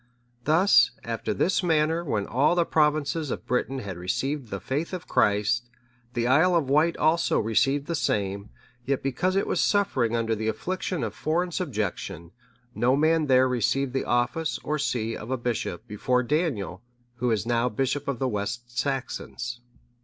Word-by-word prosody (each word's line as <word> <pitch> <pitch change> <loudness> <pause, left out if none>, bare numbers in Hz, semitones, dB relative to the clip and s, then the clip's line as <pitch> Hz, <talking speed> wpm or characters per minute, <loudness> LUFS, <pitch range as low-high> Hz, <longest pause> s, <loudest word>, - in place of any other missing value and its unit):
Thus, 170 +6 +5
after - - -3
this 190 - +1
manner, 160 -1 +2
when 110 -10 -1
all 140 +8 +2
the 170 -1 +3
provinces 150 0 +1
of - - -4
Britain 125 +2 -1
had 100 -8 -6
received 130 +10 -2
the 100 - -4
faith 150 - -3
of 180 -1 -5
Christ, 105 +4 +2 0.5
the 120 -1 0
Isle 160 +8 +4
of 145 -6 +1
Wight 160 +4 +3
also 160 +2 +2
received 135 +6 +1
the 170 - -3
same; 100 -9 -1 0.3
yet 135 +1 -1
because 160 +8 0
it 195 - +2
was - - 0
suffering 130 - +2
under 115 -1 0
the 110 0 -2
affliction 180 +4 -2
of 110 -2 -3
foreign 175 +3 -1
subjection, 105 - -3 0.4
no 120 +4 +2
man 155 +1 +2
there 130 -1 +5
received 125 +2 0
the 135 - -1
office 120 +7 0
or 150 0 -1
see 115 -5 -1
of 105 - -8
a 130 - 0
bishop, 120 -7 -3
before 125 +4 0
Daniel, 120 - -1 0.4
who 125 +1 0
is 110 -3 0
now 120 +1 +1
bishop 135 +5 -1
of 140 -3 -1
the 130 - 0
West 120 +2 -4
Saxons. 125 -2 -3
130 Hz, 170 wpm, -26 LUFS, 115-155 Hz, 0.5 s, Thus